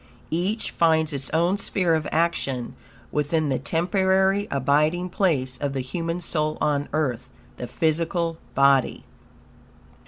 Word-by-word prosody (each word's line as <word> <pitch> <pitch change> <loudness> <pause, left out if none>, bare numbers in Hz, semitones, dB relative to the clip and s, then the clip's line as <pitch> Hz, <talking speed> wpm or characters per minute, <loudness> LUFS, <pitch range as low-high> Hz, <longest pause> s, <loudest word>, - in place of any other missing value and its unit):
Each 190 +7 -1
finds 160 -2 +2
it 135 -1 -3
own 175 +5 +1
sphere 180 -4 0
of 155 -2 0
action 140 -7 -1 0.4
within 150 +1 0
the 130 -2 0
temporary 190 +6 +1
abiding 150 +6 +1
place 135 -10 0
of 140 0 -3
the 135 - -2
human 165 +6 -4
soul 155 -2 -1
on 145 -1 0
earth 130 -5 -1 0.3
the 125 - -5
physical 165 +4 -1 0.2
body. 140 -1 +3
160 Hz, 125 wpm, -24 LUFS, 140-175 Hz, 0.4 s, body